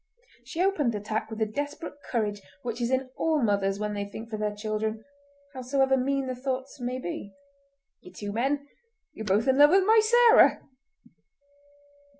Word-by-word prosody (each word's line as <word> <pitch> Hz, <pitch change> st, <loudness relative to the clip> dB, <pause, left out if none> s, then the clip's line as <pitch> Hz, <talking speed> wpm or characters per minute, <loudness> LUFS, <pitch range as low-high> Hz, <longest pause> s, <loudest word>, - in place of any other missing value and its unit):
She 320 Hz, +9 st, -2 dB
opened 310 Hz, -11 st, +1 dB
the -, -, -2 dB
attack 215 Hz, +1 st, -3 dB
with 220 Hz, -, -7 dB
the 220 Hz, -, +1 dB
desperate 290 Hz, +8 st, -5 dB, 0.2 s
courage 210 Hz, -4 st, -1 dB, 0.2 s
which 235 Hz, 0 st, -4 dB
is 235 Hz, -, 0 dB
in 260 Hz, 0 st, -1 dB
all 320 Hz, -2 st, +1 dB
mothers 200 Hz, -2 st, +1 dB
when 210 Hz, 0 st, -3 dB
they 205 Hz, 0 st, -2 dB
think 220 Hz, +3 st, -9 dB
for 215 Hz, -, -3 dB
their 210 Hz, -1 st, -2 dB
children, 215 Hz, +1 st, -3 dB, 0.5 s
howsoever 265 Hz, +1 st, +1 dB
mean 270 Hz, +1 st, 0 dB
the 255 Hz, -, -3 dB
thoughts 260 Hz, +1 st, -4 dB
may 250 Hz, +1 st, -3 dB
be. 200 Hz, -3 st, -6 dB, 0.6 s
"Ye 180 Hz, -, -14 dB
two 205 Hz, +2 st, -6 dB
men, 275 Hz, +6 st, -1 dB, 0.5 s
ye're 220 Hz, -, -7 dB
both 210 Hz, +6 st, +2 dB
in 265 Hz, +1 st, +3 dB
love 290 Hz, 0 st, +8 dB
with 380 Hz, +3 st, +4 dB
my 440 Hz, +2 st, +6 dB
Sarah!" 475 Hz, +1 st, +6 dB
245 Hz, 170 wpm, -27 LUFS, 215-275 Hz, 0.6 s, love